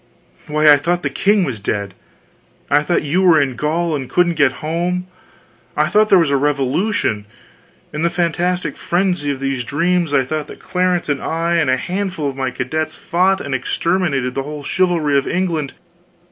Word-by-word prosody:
Why, 150 0 +2
I 145 -1 +8
thought 175 +5 -1
the 145 - -1
king 200 +7 +2
was 130 -9 -3
dead, 100 -1 -3 0.8
I 145 - +5
thought 170 +2 0
you 160 +6 +1
were 175 -4 +5
in 135 -3 0
Gaul 160 +4 -1
and 135 -3 -5
couldn't 175 -1 +2
get 145 -5 +2
home, 175 +3 -1 0.7
I - - +2
thought 215 +1 +3
there 195 - +7
was 165 -5 +2
a 140 - +3
revolution; 140 - 0 0.7
in 150 - -3
the 170 - +2
fantastic 175 -2 -1
frenzy 175 -4 0
of 140 -2 -2
these 135 -2 -2
dreams, 170 +4 0
I 135 -2 +2
thought 155 +2 -3
that - - -10
Clarence 180 -1 -1
and 145 -2 -1
I 165 +1 -1
and 160 -5 +2
a 130 - +3
handful 185 0 -3
of 135 - -4
my 135 -1 -1
cadets 155 +6 -3
fought 190 0 +1
and 140 - -5
exterminated 140 -1 0
the 135 - -2
whole 145 +1 -7
chivalry 170 -4 +1
of 140 - -6
England! 165 -6 -1
155 Hz, 185 wpm, -18 LUFS, 140-180 Hz, 0.8 s, I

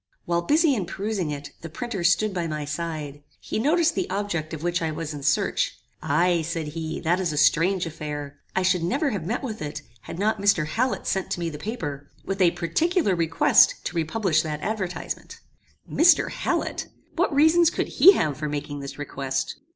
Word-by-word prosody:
While 170 0 +1
busy 300 - +3
in 200 -8 -2
perusing 200 -4 -2
it, 145 -1 -6
the 165 - -7
printer 225 0 -4
stood 190 +4 +3
by 175 -2 -2
my 150 -2 -3
side. 150 -2 -5 0.2
He - - -3
noticed 325 +6 +3
the - - -2
object 185 -5 -2
of 160 -1 -6
which 175 0 0
I 160 - 0
was 155 0 -4
in 145 - -7
search. 145 +1 +1 0.2
"Aye," 170 +3 +2
said 160 -1 -3
he, 160 +1 -4
"that 175 +2 +1
is 180 -4 0
a 150 - -4
strange 180 +5 +3
affair. 150 -3 -6 0.2
I 185 - +2
should 180 -1 +2
never 275 - 0
have 180 -6 -4
met 235 +7 -2
with 220 -5 -5
it, 145 -1 -5 0.2
had 165 - -8
not 210 +1 0
Mr. 200 -6 +3
Hallet 235 +12 -1
sent 190 -1 -1
to - - -4
me 170 -1 -2
the 150 - -8
paper, 145 - -5 0.2
with 195 0 -2
a 180 - +6
particular 195 - +1
request 165 -2 +4
to - - -4
republish 165 0 +1
that 150 -2 -4
advertisement." 190 -6 -4 0.5
"Mr. 340 +2 +4
Hallet! - - -2 0.3
What 355 +2 +1
reasons 320 +4 +5
could - - -2
he 390 - +7
have 150 - 0
for 150 -1 -3
making 145 0 -4
this 140 0 -7
request? 135 -2 -3
170 Hz, 195 wpm, -25 LUFS, 150-205 Hz, 0.5 s, he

